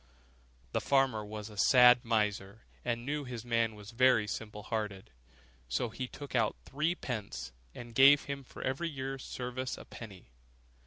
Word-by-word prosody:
The - - 0
farmer 135 -6 +2
was 105 0 -7
a 105 - -12
sad 125 +2 +7
miser, 105 -2 -1 0.2
and 120 -1 -2
knew 145 +1 -2
that - - -9
his 120 -2 -6
man 115 -2 +1
was 105 +1 -11
very 120 -2 +4
simple 105 0 -6
hearted; 105 - -4 0.6
so 115 - 0
he 125 +3 -5
took 145 +2 -9
out 115 -4 +2
threepence, 135 - -3 0.2
and 120 -1 -9
gave 140 +4 +7
him 140 -1 -5
for - - -10
every 140 +6 -1
year's 135 -2 -5
service 130 +1 -4
a - - -10
penny. 100 - -11
120 Hz, 160 wpm, -32 LUFS, 105-130 Hz, 0.6 s, sad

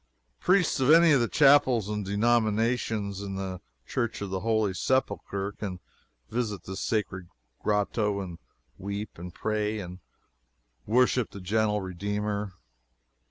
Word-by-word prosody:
Priests 180 -4 +3
of 130 +1 +2
any 165 +1 +7
of 140 -4 +5
the 120 - +2
chapels 135 -7 +5
and 105 0 -2
denominations 110 -1 +1
in 100 -1 -5
the 95 -1 -4 0.2
Church 120 -3 -2
of 100 -2 -5
the 95 - -1
Holy 110 -1 +1
Sepulchre 100 -4 -1
can 95 -3 -6 0.5
visit 110 -4 -3
this 95 0 -6
sacred 95 -5 -2 0.3
grotto 105 0 0
to 85 -2 -9 0.4
weep 100 -1 -5
and 90 +1 -7
pray 105 +2 -1
and 90 -1 -7 0.9
worship 125 +1 +3
the 100 - -9
gentle 105 +2 +1
Redeemer. 100 +2 -3
105 Hz, 130 wpm, -28 LUFS, 100-115 Hz, 0.9 s, any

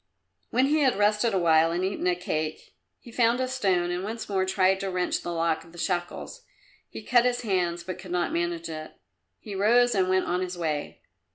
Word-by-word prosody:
When 255 +3 +2
he 300 +3 +2
had 265 -7 +3
rested 210 +3 +2
a 195 - +1
while 165 -2 +4
and 175 +2 -1
eaten 190 -1 -2
a 180 - +3
cake, 155 -3 -4 0.3
he 240 - -13
found 235 +1 +2
a 255 - 0
stone 190 -9 0
and 180 +1 -3
once 225 +2 -5
more 190 -2 0
tried 190 0 +2
to 195 - -3
wrench 180 -1 -1
the 175 - -5
lock 165 -1 0
of 165 0 -18
the - - -13
shackles. 175 - -3 0.5
He - - -9
cut 240 -2 +4
his 245 -1 0
hands, 180 -6 -1
but 185 +1 -6
could 185 0 -10
not 175 0 -1
manage 170 -1 -2
it. 155 -1 -7 0.5
He 210 - -8
rose 240 +5 +4
and 190 -3 +1
went 185 0 +2
on 180 +1 -1
his 180 -1 -4
way. 155 -4 -3
185 Hz, 215 wpm, -26 LUFS, 175-215 Hz, 0.5 s, while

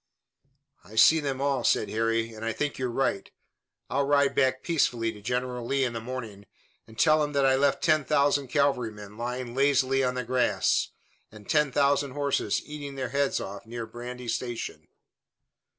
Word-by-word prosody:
"I 105 +5 -14
see 160 +9 +7
them 140 -3 -3
all," 140 -3 0
said 105 - +2
Harry, 115 +1 0
"and 110 0 -9
I 115 0 -1
think 150 -2 -3
you're 130 -1 -1
right. 120 -5 -1 0.6
I'll 140 0 0
ride 140 -1 +3
back 130 -1 +1
peaceably 120 -9 +1
to 105 - -13
General 125 +2 -2
Lee 135 +3 0
in 120 -2 -1
the 115 - -4
morning, 115 -5 -7 0.4
and 110 - -16
tell 155 -1 +4
him 145 0 -3
that 140 -1 +2
I 135 0 +4
left 140 0 +1
ten 155 -2 +3
thousand 145 -1 +2
cavalrymen 115 -8 -1
lying 120 +1 -4
lazily 135 0 +2
on 125 0 0
the 125 - -2
grass, 125 +1 +1 0.4
and 105 -2 -14
ten 150 -2 +2
thousand 140 0 +2
horses 140 -1 0
eating 145 -2 -7
their 130 -2 -3
heads 140 0 0
off 100 +3 -7
near 115 0 -5
Brandy 120 +2 -8
Station." 120 0 -4
130 Hz, 175 wpm, -27 LUFS, 115-140 Hz, 0.6 s, see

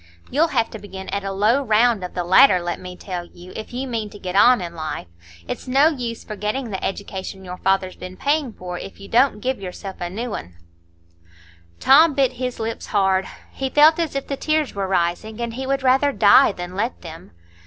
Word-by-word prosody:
You'll 305 +5 +3
have 230 -7 0
to 220 - -7
begin 190 -2 -9
at 200 0 -2
a 195 - -3
low 215 +7 +2
round 225 -3 +3
of 180 - -7
the 180 - -1
ladder, 185 +3 +6
let 175 0 -4
me 180 0 -8
tell 180 -2 -5
you, 175 +2 -14
if 220 - -7
you 255 +2 -3
mean 225 -4 -3
to 205 - -12
get 185 -2 -6
on 245 +4 +6
in 170 -2 -6
life. 155 - -5 0.4
It's - - -5
no 275 +5 +5
use 245 -7 -5
forgetting 215 +4 -4
the 190 - -4
education 190 -1 -5
your 180 0 -7
father's 190 -1 0
been 185 0 -9
paying 285 -3 0
for, 180 -3 -7
if 195 - -10
you 200 - -10
don't 230 -1 +3
give 260 0 -1
yourself 190 +1 -7
a 175 - -2
new 225 +4 -4
un." 85 0 -7 1.2
Tom 295 +2 +6
bit 270 -2 +3
his 250 -2 -3
lips 225 0 -4
hard; 190 -2 +1 0.2
he 265 0 -3
felt 305 +4 +5
as 330 -4 -2
if 275 - -2
the 280 - -3
tears 310 -1 0
were 195 -1 -2
rising, 190 +5 -1
and 235 -1 -3
he 260 +2 -5
would 275 0 0
rather 265 +2 +4
die 210 -6 +6
than 175 -1 -7
let 225 +5 -2
them. 165 -1 -10
210 Hz, 215 wpm, -21 LUFS, 185-260 Hz, 1.2 s, ladder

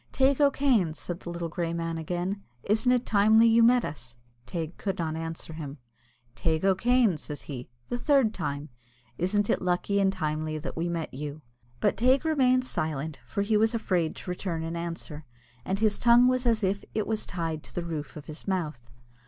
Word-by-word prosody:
"Teig 270 +2 +3
O'Kane," 265 - +3
said 175 +2 -5
the 175 - -8
little 170 0 -3
grey 165 +1 -2
man 165 -1 -2
again, 180 +5 -3 0.2
"isn't 220 +4 +2
it 250 -1 +2
timely 220 +2 +5
you 230 0 +5
met 240 +1 +5
us?" 120 -5 -8 0.3
Teig 165 +4 -4
could 195 -2 -2
not 160 -2 -2
answer 165 0 -5
him. 150 -2 -7 0.6
"Teig 160 +8 0
O'Kane," 220 0 +3
says 150 -1 -7
he, 125 -4 -7 0.2
"the 245 - -2
third 270 -6 +3
time, 145 -3 -4 0.5
isn't 205 +4 +1
it - - +1
lucky 180 +3 +1
and 195 -1 +3
timely 155 -3 -2
that 150 -3 -6
we 170 +1 -1
met 165 -2 -3
you?" 145 +2 -6 0.4
But - - +1
Teig 260 +5 +3
remained 255 -5 +3
silent, 155 - -3
for 200 - -1
he 215 +1 +1
was 220 +2 +3
afraid 180 -7 0
to 180 - -6
return 175 -3 -3
an 165 +1 -4
answer, 165 -2 -5 0.4
and 190 - -1
his 215 0 +2
tongue 240 +1 +6
was 255 -1 +2
as 225 -2 +2
if 195 +1 0
it 215 - +1
was 220 -1 -2
tied 165 -3 -3
to - - -14
the 175 - -2
roof 155 -4 -5
of 150 - -9
his 155 +5 -9
mouth. 155 -11 -2
180 Hz, 195 wpm, -28 LUFS, 160-220 Hz, 0.6 s, tongue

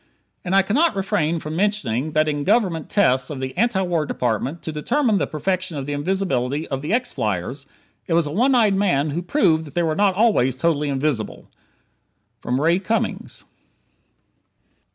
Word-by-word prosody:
And 185 +1 -1
I 195 - +5
cannot 275 - +2
refrain 170 -4 0
from 155 0 -6
mentioning 155 - 0
that 155 0 +2
in 145 -1 -1
Government 190 -5 +1
tests 130 -11 +2
of 145 -3 -5
the 130 0 -5
Anti 205 -1 +1
War 175 -4 0
Department 125 +7 -2
to 160 - -4
determine 220 - +1
the - - 0
perfection 185 +2 -2
of 135 - -4
the 145 - -3
invisibility 145 -4 -1
of 135 -1 -3
the 150 +5 -4
X 245 +3 0
flyers, 110 - -3 0.4
it 165 - +1
was 170 -1 +3
a 145 - -4
one 250 - +2
eyed 220 -5 +4
man 165 -7 +1
who 165 +4 -2
proved 175 - +2
that 145 - -13
they 175 - +1
were 160 -1 0
not 200 0 +2
always 195 - +3
totally 150 +1 0
invisible! 135 -5 -2 0.9
Ray 155 +8 +1
Cummings. 220 +4 -3
165 Hz, 175 wpm, -21 LUFS, 140-195 Hz, 0.9 s, I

